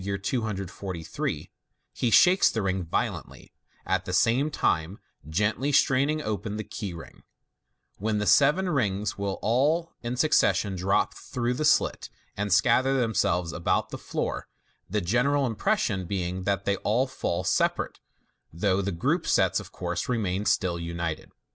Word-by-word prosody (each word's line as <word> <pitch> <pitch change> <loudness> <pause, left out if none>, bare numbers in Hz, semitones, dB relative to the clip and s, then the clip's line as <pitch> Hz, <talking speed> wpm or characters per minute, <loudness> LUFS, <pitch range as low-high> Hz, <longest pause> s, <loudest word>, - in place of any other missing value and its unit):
243), 100 -4 -3 0.4
he 120 - 0
shakes 180 - +6
the 110 - -2
rings 95 -2 -1
violently, - - -3 0.3
at 95 0 0
the 95 - -4
same 120 +9 +3
time 85 - 0 0.3
gently 105 - 0
straining 145 +2 +2
open 105 0 -3
the 110 - -3
key 100 -1 -6
ring, 85 -1 -11 0.8
when 105 +2 0
the 105 - -1
seven 150 - +4
rings 105 - -1
will 100 -1 -2
all 150 +9 +1
in 120 +1 -4
succession 110 -8 +2
drop 95 +2 +1
through 120 0 -3
the 135 - -2
slit, 150 - +2 0.3
and 100 0 -2
scatter 130 +7 +4
themselves 90 -7 0
about 85 - 0
the - - -4
floor, - - -3 0.4
the 105 +3 0
general 125 +9 +2
impression 115 - 0
being 90 -1 -3
that 100 -1 0
they 100 -1 +1
all 115 +7 +1
fall 90 -9 -3
separate, 90 - 0 0.5
though 95 +3 +1
the 100 +1 -2
grouped 85 - 0
sets, - - +3
of - - -10
course, - - -4
remain 105 -4 -1
still 85 -4 +1
united. 85 -1 -4
105 Hz, 145 wpm, -27 LUFS, 95-125 Hz, 0.8 s, shakes